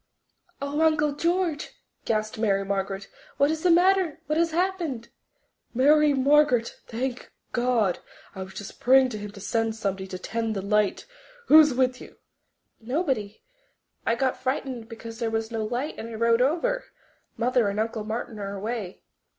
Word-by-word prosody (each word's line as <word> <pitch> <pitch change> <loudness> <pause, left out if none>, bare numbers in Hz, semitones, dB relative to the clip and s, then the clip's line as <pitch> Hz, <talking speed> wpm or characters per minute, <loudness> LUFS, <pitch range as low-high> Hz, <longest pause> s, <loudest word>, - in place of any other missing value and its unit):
"Oh, 285 +2 -2
Uncle 310 -2 +3
George," 335 +1 -1 0.3
gasped 215 -1 -1
Mary 195 -3 +1
Margaret, 195 0 -2 0.3
"what 280 +2 +3
is 315 0 -3
the 360 - +3
matter? 355 -2 +4
What 305 +2 0
has 335 0 +3
happened?" 335 -8 -2 0.7
"Mary 300 +4 +5
Margaret! 275 -3 +3
Thank 250 +2 -4 0.2
God! 240 -6 +1 0.3
I 190 - -7
was 190 0 -8
just 200 0 -8
praying 260 +1 +5
to 215 -3 -5
Him 205 0 -6
to 205 - -11
send 225 +2 -1
somebody 195 -3 -3
to 185 - -6
'tend 225 +3 -3
the 195 - -3
light. 210 0 +1 0.4
Who's 305 -3 +8
with 255 0 +1
you?" - - -13 0.6
"Nobody.... 245 - -2 0.6
I 230 - +1
got 260 +1 -1
frightened 255 -3 -3
because 230 0 -9
there 230 - 0
was 225 0 -2
no 225 -1 -2
light 245 +7 -3
and 230 - -6
I 230 - -7
rowed 230 +1 +3
over. 350 - +1 0.5
Mother 245 -2 +2
and 200 +1 -3
Uncle 225 0 -2
Martin 220 0 -5
are 200 0 -4
away." 210 -2 -5
240 Hz, 160 wpm, -26 LUFS, 215-295 Hz, 0.7 s, Who's